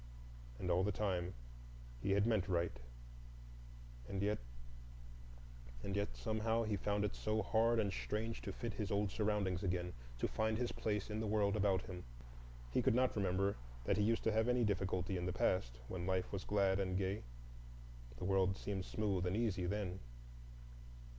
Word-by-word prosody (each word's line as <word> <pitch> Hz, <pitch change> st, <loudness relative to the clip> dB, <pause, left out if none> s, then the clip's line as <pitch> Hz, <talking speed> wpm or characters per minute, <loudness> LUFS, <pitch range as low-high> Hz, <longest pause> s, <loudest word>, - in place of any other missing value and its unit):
And 90 Hz, +5 st, -1 dB
all 90 Hz, +2 st, +4 dB
the 105 Hz, -, +2 dB
time 90 Hz, -3 st, -1 dB, 0.7 s
he 100 Hz, -, +2 dB
had 100 Hz, +1 st, +4 dB
meant 110 Hz, -5 st, +2 dB
right,—and -, -, -6 dB
yet, 105 Hz, +1 st, +1 dB, 1.4 s
and 100 Hz, -, -2 dB
yet, 100 Hz, -11 st, -1 dB
somehow 110 Hz, -, +1 dB
he 110 Hz, -2 st, 0 dB
found 105 Hz, +1 st, 0 dB
it 105 Hz, -, -2 dB
so 110 Hz, 0 st, 0 dB
hard 115 Hz, +1 st, +3 dB
and 100 Hz, -3 st, +1 dB
strange 110 Hz, +2 st, -2 dB
to -, -, -4 dB
fit 120 Hz, -3 st, -4 dB
his 105 Hz, -1 st, -3 dB
old 100 Hz, -1 st, +1 dB
surroundings 105 Hz, -4 st, +1 dB
again, 90 Hz, -2 st, -1 dB, 0.2 s
to -, -, +1 dB
find 110 Hz, 0 st, 0 dB
his 120 Hz, 0 st, 0 dB
place 105 Hz, -1 st, -1 dB
in 105 Hz, -, -1 dB
the 110 Hz, -, -1 dB
world 105 Hz, -1 st, +2 dB
about 95 Hz, -3 st, +2 dB
him. 90 Hz, -1 st, -7 dB, 0.7 s
He -, -, +3 dB
could -, -, +3 dB
not 130 Hz, 0 st, +3 dB
remember 100 Hz, 0 st, +1 dB, 0.3 s
that 100 Hz, -, +2 dB
he 105 Hz, -, +3 dB
used 115 Hz, +2 st, +2 dB
to 110 Hz, -, +3 dB
have 110 Hz, +1 st, +2 dB
any 125 Hz, 0 st, +3 dB
difficulty 95 Hz, -2 st, 0 dB
in 90 Hz, +1 st, -2 dB
the 90 Hz, -, -1 dB
past, 60 Hz, -10 st, +1 dB
when 90 Hz, -1 st, -4 dB
life 95 Hz, -1 st, 0 dB
was 95 Hz, -2 st, -3 dB
glad 100 Hz, -1 st, +3 dB
and 95 Hz, -1 st, 0 dB
gay. 95 Hz, +1 st, 0 dB, 1.0 s
The 90 Hz, -, -4 dB
world 95 Hz, 0 st, +3 dB
seemed 95 Hz, -2 st, -3 dB
smooth 100 Hz, -4 st, 0 dB
and 95 Hz, +4 st, 0 dB
easy 100 Hz, -6 st, +1 dB
then. 95 Hz, -1 st, -2 dB
100 Hz, 175 wpm, -38 LUFS, 90-105 Hz, 1.4 s, all